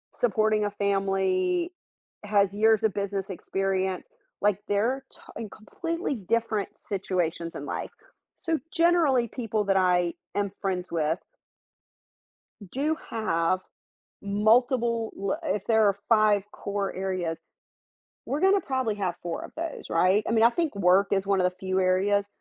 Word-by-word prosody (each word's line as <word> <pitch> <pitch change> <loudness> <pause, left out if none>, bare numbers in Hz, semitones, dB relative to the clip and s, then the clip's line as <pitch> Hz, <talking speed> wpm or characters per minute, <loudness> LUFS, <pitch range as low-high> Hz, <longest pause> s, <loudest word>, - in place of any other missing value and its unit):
supporting 215 -2 +2
a 205 - -1
family, 205 - 0 0.5
has 200 -1 +2
years 220 +1 +3
of 220 - +2
business 200 -1 -3
experience. 190 0 -2 0.3
Like 205 -1 +2
they're 235 +7 0
to - - -16 0.2
in 220 -3 -5
completely 330 - -4
different 220 0 -1
situations 175 -4 -2
in - - -6
life. - - -4 0.5
So 330 -3 -1 0.2
generally 330 -8 +3
people 220 -3 -2
that 195 -1 +2
I 180 -2 +3 0.2
am 200 -1 0
friends 185 -2 -2
with 160 +1 0 1.5
do 300 +4 0
have 185 -4 0 0.6
multiple, 230 +3 +2
lo 200 +10 -1
if 210 - -1
there 220 -2 +5
are 200 -1 +2
5 215 -3 +4
core 200 -1 -3
areas, 185 -3 -2 0.9
we're 290 +5 -2
going 390 +1 +5
to - - -14
probably 260 -6 0
have 185 -4 -2
4 170 - -4
of - - -9
those, 325 -1 -5
right? 185 +5 +3
I - - 0
mean, 225 -1 +4
I 235 - +8
think 315 -3 -1
work 195 +1 +4
is 195 -1 +1
one 195 -1 +2
of 180 0 +3
the 180 - -22
few 190 -1 0
areas 200 +2 +2
205 Hz, 145 wpm, -27 LUFS, 190-230 Hz, 1.5 s, I